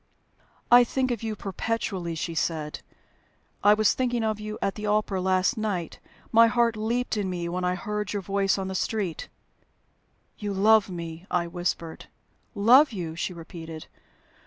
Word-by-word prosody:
"I 245 0 +9
think 255 +1 -1
of 235 - -2
you 220 -1 -3
perpetually," 195 -4 -3
she 165 +1 -3
said. 155 -2 -2 0.8
"I 205 +1 +7
was 215 -1 +3
thinking 245 -2 -1
of 215 -1 -1
you 215 0 -5
at 195 - -1
the 210 +1 -5
opera 210 -2 +1
last 185 +6 +2
night. 195 -6 -3 0.3
My 230 0 +7
heart 235 -1 +2
leaped 230 +2 -1
in 200 -2 -1
me 175 -2 -3
when 180 +1 -3
I 180 0 +1
heard 210 +2 -3
your 205 -2 -3
voice 195 +1 +1
in 190 -1 -3
the 190 - -4
street." 190 -3 -2 1.1
"You 205 -2 -3
love 215 +1 +5
me!" 170 0 -7
I 175 -1 +1
whispered. 170 -1 -4 0.5
"Love 250 +8 +6
you!" 170 -6 -5
she 175 - -3
repeated. 165 -2 -9
200 Hz, 160 wpm, -26 LUFS, 175-220 Hz, 1.1 s, I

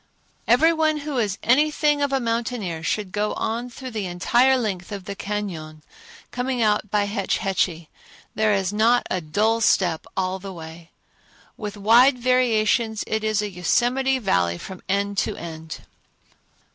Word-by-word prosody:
Every 305 +8 +5
one 315 -1 +1
who 285 -3 -3
is 205 -4 -1
anything 295 +3 +3
of 285 -1 +1
a 270 - +1
mountaineer 230 -7 -2
should 195 +4 -2
go 210 +1 -1
on 235 +3 -3
through 255 +1 -8
the 215 -4 -3
entire 240 +9 +3
length 200 -7 -3
of 200 -2 -6
the 200 - -5
cañon, 175 -8 -5 0.5
coming 250 0 -2
out 210 -2 +1
by 205 0 +2
Hetch 205 +2 -1
Hetchy. 175 -5 -1 0.5
There 215 0 +2
is 195 -1 0
not 230 +3 +3
a 185 - 0
dull 215 +9 +1
step 175 -7 +2
all 190 0 -1
the 195 0 -8
way. 165 0 -10 0.7
With 210 -2 -6
wide 240 +6 +5
variations, 235 -3 +1
it 220 0 -2
is 215 -1 +1
a 205 - -4
Yosemite 245 +9 +1
Valley 90 - +1
from 185 - -9
end 200 0 0
to - - -1
end. 160 -1 -8
210 Hz, 160 wpm, -23 LUFS, 185-245 Hz, 0.7 s, Every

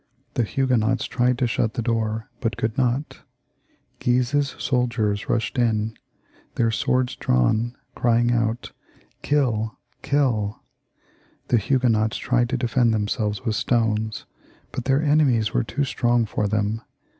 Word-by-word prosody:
The - - +1
Huguenots 125 0 +1
tried 125 0 +1
to 125 - +1
shut 115 -1 0
the 120 - -1
door, 110 -1 -1
but 115 -3 -2
could 110 -1 -1
not; 130 +3 -1 0.8
Guise's 130 +3 +1
soldiers 115 -5 0
rushed 120 +2 0
in, 110 -2 +1 0.6
their 115 -1 +2
swords 125 +2 0
drawn, 110 - +1 0.2
crying 120 0 +2
out. 115 0 -1 0.3
" - - -34
Kill, 120 -7 0 0.2
Trill/' 120 -8 +1 0.9
The 120 - +4
Huguenots 115 -2 +1
tried 120 -1 +1
to 130 - 0
defend 120 -1 +2
themselves 105 0 -2
with 110 -3 0
stones, 110 -3 0 0.5
but 125 - -5
their 135 +3 +2
enemies 140 -8 +3
were - - +2
too 140 +5 -2
strong 120 -3 +1
for 105 0 -1
them. 105 +1 -1
120 Hz, 135 wpm, -23 LUFS, 110-125 Hz, 0.9 s, The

